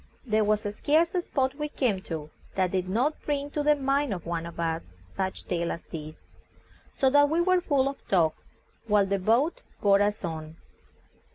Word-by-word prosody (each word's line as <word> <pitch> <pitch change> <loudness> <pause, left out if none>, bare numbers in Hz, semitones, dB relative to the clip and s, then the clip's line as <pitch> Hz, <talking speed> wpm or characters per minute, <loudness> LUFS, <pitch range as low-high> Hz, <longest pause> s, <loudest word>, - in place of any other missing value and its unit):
There 215 -2 +2
was 210 0 +2
scarce 295 +11 +1
a 360 - +1
spot 265 -5 0
we 300 +1 -4
came 230 -10 0
to 155 -2 -5 0.2
that 185 -2 +1
did 185 -1 -1
not 255 +10 0
bring 290 -1 -2
to 295 - -1
the 300 0 +4
mind 275 -4 0
of 175 - -9
one 170 0 -3
of 170 - -10
us 165 0 0 0.2
some 90 - -25
such 190 0 -3
tale 170 -1 -1
as 170 - -5
this, 155 -1 -8 0.8
so 265 -1 +2
that 290 +1 +5
we 325 +2 +1
were 365 +1 +3
full 280 -6 +2
of 275 0 -6
talk 165 -5 +3 0.5
while 205 -2 +4
the 195 0 0
boat 235 - +2 0.2
bore 200 -1 +4
us 205 +1 0
on. 160 -1 -6
210 Hz, 195 wpm, -27 LUFS, 175-285 Hz, 0.8 s, that